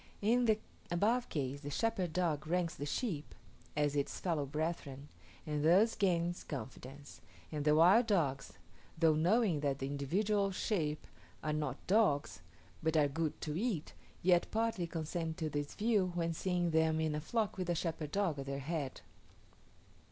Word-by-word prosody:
In 240 +4 +3
the 220 -2 +4 0.3
above 220 +8 +1
case 140 -1 -3
the 145 - -5
shepherd 185 +1 0
dog 155 -3 0
ranks 175 0 0
the 145 - -5
sheep 160 - -3 0.4
as 145 -1 +1
its 140 -1 -1
fellow 160 -6 -1
brethren, 145 -2 -4 0.4
and 150 -1 -2
thus 190 +8 +5
gains 175 -4 0
confidence; 140 0 -8 0.3
and 150 -2 -3
the 150 0 +5
wild 190 +9 +6
dogs, 145 -10 0 0.4
though 160 -1 +5
knowing 175 +2 +3
that 140 -2 0
the 135 - -3
individual 195 +9 0
sheep 165 -6 -1 0.4
are 155 - 0
not 150 -3 -3
dogs, 145 - +2 0.4
but 160 0 +1
are 150 -2 +5
good 155 +2 -2
to 150 -1 -3
eat, 195 -5 -2 0.3
yet 175 -1 +4
partly 225 -5 0
consent 165 0 -3
to 160 -3 -2
this 145 -1 -3
view 205 -4 +2
when 170 -1 0
seeing 175 0 0
them 160 0 +3
in 160 -1 0
a 150 - -2
flock 220 +4 -1
with 185 -2 -3
a 175 - +2
shepherd 160 -3 -3
dog 185 -7 0
at 135 - -5
their 140 0 -2
head. 140 -1 -4
160 Hz, 165 wpm, -34 LUFS, 145-185 Hz, 0.4 s, wild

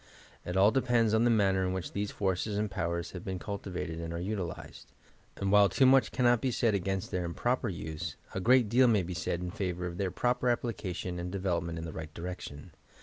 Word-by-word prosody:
It 90 +1 -3
all 100 +3 +6
depends 120 -4 +2
on 110 +1 +4
the - - +4
manner 95 -4 +3
in 90 0 0
which 95 -2 -4
these 100 0 -2
forces 100 +2 -1
and 105 -1 -1
powers 85 -3 -2
have 90 -1 -7
been 95 -1 -3
cultivated 90 -4 -5
and 85 0 -5
are 85 - -3
utilized; 90 -2 -5 0.5
and 100 -1 -1
while 100 -1 +6
too 135 - +3
much 130 -2 +5
cannot 120 -2 +3
be 130 - +1
said 115 -2 +1
against 95 -1 -2
their 90 -1 -1
improper 120 +8 -1
use, 80 -4 -5 0.2
a - - -2
great 125 +4 +5
deal 125 +4 +5
may 105 -5 +3
be 90 +2 -5
said 85 0 -2
in 90 0 -4
favour 90 -4 -3
of 85 -1 -5
their 95 -2 0
proper 125 +6 0
application 95 -7 -2
and 90 +1 -4
de 100 - -3
velopment 85 -3 -1
in 80 - -5
the 80 - -6
right 80 -1 -7
direction. 85 -4 -7
95 Hz, 220 wpm, -30 LUFS, 90-110 Hz, 0.5 s, all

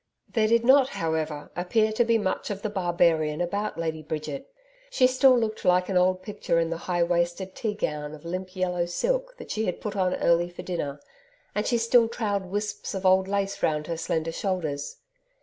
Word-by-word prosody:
There 220 -2 +3
did 230 +1 +3
not, 265 +1 +6
however, 160 - -3
appear 215 +5 +1
to 220 +2 +2
be 230 -1 +3
much 190 -4 -2
of 200 -1 -5
the 215 - -2
barbarian 170 -5 +1
about 200 +4 -2
Lady 160 -1 -2
Bridget. 155 - -5 0.4
She 265 - +3
still 260 0 +5
looked 220 -2 -2
like 180 0 +3
an 190 - -1
old 185 +1 +3
picture 205 -4 -1
in 165 0 0
the 165 - -2
high 175 -1 +2
waisted 175 +2 -1
tea 215 0 -3
gown 150 -5 -3
of 155 - -15
limp 185 +2 -5
yellow 180 -2 0
silk - - -1
that 475 - -9
she 220 +1 -1
had 180 - -2
put 210 -1 -5
on 185 -2 +1
early 170 +1 +2
for 175 - -9
dinner, 145 -6 -3 0.5
and 210 +1 -1
she 240 - +2
still 230 0 +4
trailed 205 -4 -2
wisps 205 +1 -3
of 190 0 -4
old 190 0 +5
lace 200 0 -1
round 150 -1 +1
her 170 - -3
slender 160 0 -1
shoulders. 165 -6 -3
185 Hz, 200 wpm, -26 LUFS, 170-215 Hz, 0.5 s, not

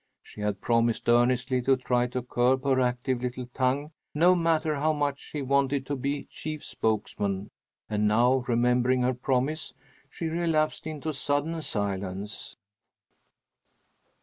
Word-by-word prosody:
She 105 - -11
had 105 -2 -2
promised 115 -1 +1
earnestly 125 +2 +3
to 135 +1 +3
try 125 -1 +1
to 125 0 -4
curb 125 +1 +1
her 135 -2 +2
active 125 0 0
little 125 0 -3
tongue, 135 +4 0 0.2
no 175 +4 +6
matter 160 -3 +1
how 155 +2 +2
much 145 -1 -1
she 145 -2 -6
wanted 140 0 +1
to 145 - -2
be 140 +2 -2
chief 155 -1 -7
spokesman, 105 -2 -2 0.4
and 105 0 +1
now, 120 +4 +3
remembering 125 +1 +2
her 130 +1 +2
promise, 135 +5 -1 0.4
she 170 - -6
relapsed 160 -2 0
into 155 0 -4
sudden 145 +4 -1
silence. 100 -3 -4
130 Hz, 135 wpm, -27 LUFS, 120-145 Hz, 0.4 s, no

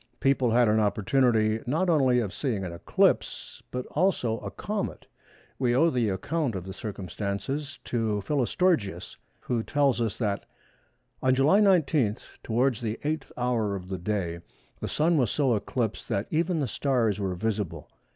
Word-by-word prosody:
People 135 -3 +2
had 120 +1 +4
an 110 +1 +3
opportunity 110 +1 +2
not 160 +9 +1
only 135 -7 +4
of 105 -4 -4
seeing 115 -9 -2
an 90 - -4
eclipse, 85 - 0
but 125 0 -4
also 145 -10 +1
a - - -6
comet. 205 -1 -4 0.5
We 120 -2 +2
owe 165 +5 +4
the 120 -4 +1
account 135 - -1
of 95 - -4
the 95 +1 -7
circumstances 105 - -4
to 110 -4 -1
Philostorgius, 140 - 0 0.3
who 120 -2 -1
tells 140 0 +1
us 115 -3 -1
that—"On 115 +4 -4
July 145 +10 +5
19, 155 - +3 0.2
towards 120 +1 +1
the 110 -1 -3
8th 155 +2 -2
hour 120 -5 0
of 90 -1 -7
the 95 -1 -3
day, 90 -3 -2 0.4
the - - -4
Sun 160 +2 +2
was 125 -5 +2
so 135 -1 +2
eclipsed, 110 +1 -3
that 100 +2 0
even 165 +1 +1
the 135 - 0
stars 120 -8 0
were 95 -2 -1
visible. 95 -6 -3
120 Hz, 155 wpm, -27 LUFS, 105-140 Hz, 0.5 s, July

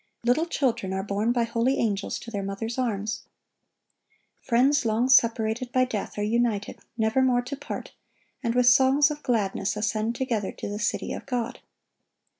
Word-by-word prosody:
Little 250 +8 +2
children 240 - -1
are 190 0 -2
borne 205 +3 0
by 240 -1 +1
holy 235 +3 0
angels 205 -3 -1
to 230 - -9
their 200 -2 -3
mothers' 210 +5 -4
arms. 215 -3 -2 1.2
Friends 270 +4 +3
long 230 +2 +1
separated 230 0 +3
by 255 0 +3
death 215 -5 -5
are 205 - -1
united, 220 -2 0 0.2
nevermore 245 +2 +2
to 265 +3 -5
part, 280 - -7 0.5
and 235 -2 -1
with 250 0 +4
songs 265 +4 +5
of 295 0 -6
gladness 205 -4 -1
ascend 220 +2 -1
together 235 -6 -1
to - - -6
the 205 +1 -4
city 210 - -1
of - - -8
God. 245 -3 -3
235 Hz, 160 wpm, -26 LUFS, 210-255 Hz, 1.2 s, songs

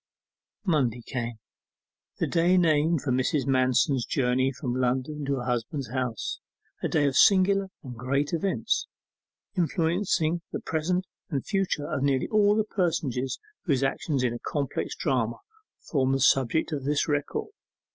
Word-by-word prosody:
Monday 130 - +1
came, 120 -3 -3 0.8
the - - +1
day 175 +2 +3
named 160 -2 +3
for 135 - -1
Mrs. 130 +3 +1
Manston's 130 0 +2
journey 130 +1 +1
from 125 -2 -4
London 130 +4 -1
to 140 0 0
her 125 - -4
husband's 125 +2 -2
house; 125 -4 -2 0.4
a - - 0
day 150 -2 +2
of 135 -2 +1
singular 195 +2 +5 0.2
and 125 -3 -8
great 140 +6 -1
events, 190 +4 0 0.7
influencing 170 -1 +1
the - - -3
present 180 +4 -1 0.2
and 140 -5 -2
future 190 -7 -1
of 135 - -2
nearly 135 -2 +1
all 210 -1 +4
the 215 - +2
personages 155 - -1 0.3
whose 140 -6 +1
actions 135 0 0
in 120 -2 +1
a 120 - -5
complex 140 -3 -3
drama 115 -3 0 0.4
form 135 -3 0
the 135 - +1
subject 135 +4 +3
of 145 -3 -3
this 145 +1 +1
record. 145 -2 -1
140 Hz, 145 wpm, -27 LUFS, 130-165 Hz, 0.8 s, singular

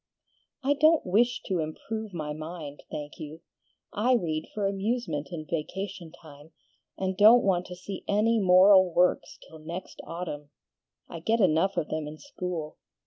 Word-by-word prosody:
"I 280 +2 +3
don't 310 +3 +4
WISH 235 +6 +2
to 185 -3 -1
improve 210 +7 -5
my 155 -4 -4
mind, 155 -2 -8
thank 150 0 -7
you: 155 +1 -8 0.5
I 240 +5 +2
read 160 -8 -2
for 210 -2 -2
amusement 195 - -2
in 160 -3 -6
vacation 170 +2 -5
time, 155 -1 -15 0.4
and 190 0 -2
don't 220 +5 +7
want 180 -2 +1
to 180 - -8
see 185 +2 -7
any 220 +3 +2
moral 185 0 +6
works 180 +2 +1
till 160 - -13
next 170 +4 -8
autumn. 165 -4 -6 0.6
I 170 - -8
get 225 +8 +1
enough 190 0 +2
of 155 - -1
them 155 -1 -3
in 150 +1 -8
school. 180 - -6
180 Hz, 155 wpm, -27 LUFS, 155-205 Hz, 0.6 s, don't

